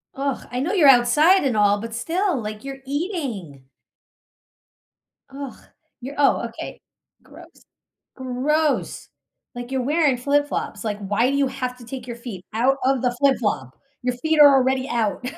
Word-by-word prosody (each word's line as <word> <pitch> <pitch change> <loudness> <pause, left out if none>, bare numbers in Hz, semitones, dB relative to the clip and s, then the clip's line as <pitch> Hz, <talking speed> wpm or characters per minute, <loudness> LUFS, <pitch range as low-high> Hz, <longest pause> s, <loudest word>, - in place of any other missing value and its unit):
Ugh, 275 0 -3
I 250 - -2
know 320 +9 -1
you're 315 -9 +6
outside 295 +10 +5
and 260 -5 0
all, 205 -1 +3
but 225 +1 -7
still, 335 - -1
like, 215 0 -6
you're 270 0 -7
eating. 265 - -4 1.7
Ugh, 275 -1 -7 0.5
you're 270 +4 -7
oh, 285 - +3
okay, - - -9 0.4
gross, - - -14 0.7
gross, 280 +4 -1 0.5
like, 245 0 -7
you're 265 -1 0
wearing 290 0 +2
flip 290 +3 +1
flops, 210 -6 -4
like, 210 -2 -2
"Why 210 +5 +1
do 280 - 0
you 280 -1 +2
have 255 -1 -4
to 240 - -12
take 250 +1 -8
your 240 -1 -6
feet 230 -7 -8
out 255 +5 +2
of 265 -1 +2
the 250 - +2
flip 275 -1 +4
flop? 130 - -2 0.3
Your 250 0 -1
feet 315 +4 0
are 285 -1 +9
already 260 0 +1
out." 230 -1 -1
260 Hz, 165 wpm, -22 LUFS, 235-280 Hz, 1.7 s, are